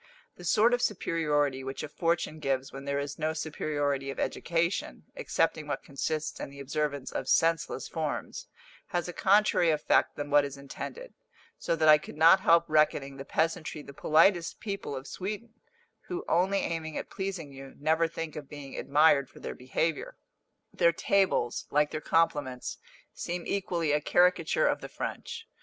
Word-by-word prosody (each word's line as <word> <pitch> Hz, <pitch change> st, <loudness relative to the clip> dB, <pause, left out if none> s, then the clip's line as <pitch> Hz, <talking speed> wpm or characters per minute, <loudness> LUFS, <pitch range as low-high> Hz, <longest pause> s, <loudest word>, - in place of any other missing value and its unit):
The 175 Hz, -, -13 dB
sort 215 Hz, +7 st, +4 dB
of 245 Hz, -, +2 dB
superiority 150 Hz, -, 0 dB
which 135 Hz, +1 st, -5 dB
a -, -, -3 dB
fortune 165 Hz, 0 st, -1 dB
gives 135 Hz, -2 st, -2 dB
when 135 Hz, 0 st, -8 dB
there 140 Hz, 0 st, -1 dB
is 140 Hz, +1 st, -4 dB
no 155 Hz, +1 st, 0 dB
superiority 145 Hz, -3 st, -2 dB
of 135 Hz, -, -5 dB
education, 170 Hz, +2 st, -1 dB
excepting -, -, 0 dB
what -, -, -3 dB
consists 155 Hz, +3 st, -3 dB
in -, -, -5 dB
the 140 Hz, 0 st, -12 dB
observance 145 Hz, 0 st, -2 dB
of -, -, -4 dB
senseless 165 Hz, -5 st, +2 dB
forms, 155 Hz, -2 st, -4 dB, 0.4 s
has 175 Hz, -1 st, -2 dB
a 175 Hz, -, -5 dB
contrary 195 Hz, -3 st, +3 dB
effect 155 Hz, -2 st, +2 dB
than 145 Hz, -1 st, -5 dB
what 145 Hz, 0 st, +6 dB
is 140 Hz, -1 st, -5 dB
intended; 475 Hz, -, -8 dB, 0.5 s
so -, -, 0 dB
that 160 Hz, -1 st, +2 dB
I 150 Hz, -1 st, +8 dB
could 150 Hz, -, -11 dB
not 165 Hz, +4 st, +7 dB
help 170 Hz, -2 st, +4 dB
reckoning 150 Hz, -3 st, +2 dB
the 135 Hz, -, -7 dB
peasantry 160 Hz, -1 st, -1 dB
the 140 Hz, -, -11 dB
politest 170 Hz, +4 st, +3 dB
people 200 Hz, -8 st, -4 dB
of 130 Hz, 0 st, -6 dB
Sweden, 210 Hz, +7 st, -6 dB, 0.5 s
who, 360 Hz, 0 st, -4 dB
only 185 Hz, +4 st, +2 dB
aiming 160 Hz, -2 st, -3 dB
at -, -, -6 dB
pleasing 190 Hz, -7 st, -4 dB
you, 135 Hz, 0 st, -11 dB
never 160 Hz, +3 st, +2 dB
think 165 Hz, -1 st, -6 dB
of 145 Hz, -2 st, -8 dB
being 145 Hz, -2 st, -9 dB
admired 145 Hz, -1 st, +3 dB
for -, -, -15 dB
their -, -, -5 dB
behaviour. 145 Hz, +5 st, -2 dB, 0.6 s
Their 170 Hz, -, +4 dB
tables, 185 Hz, -10 st, +1 dB
like 150 Hz, 0 st, +2 dB
their 155 Hz, -, -4 dB
compliments, 145 Hz, -7 st, 0 dB, 0.3 s
seem 175 Hz, 0 st, -4 dB
equally 175 Hz, -5 st, -1 dB
a 150 Hz, 0 st, +2 dB
caricature 180 Hz, -, +3 dB
of -, -, 0 dB
the -, -, -7 dB
French. 455 Hz, -, -6 dB
155 Hz, 170 wpm, -29 LUFS, 140-170 Hz, 0.6 s, I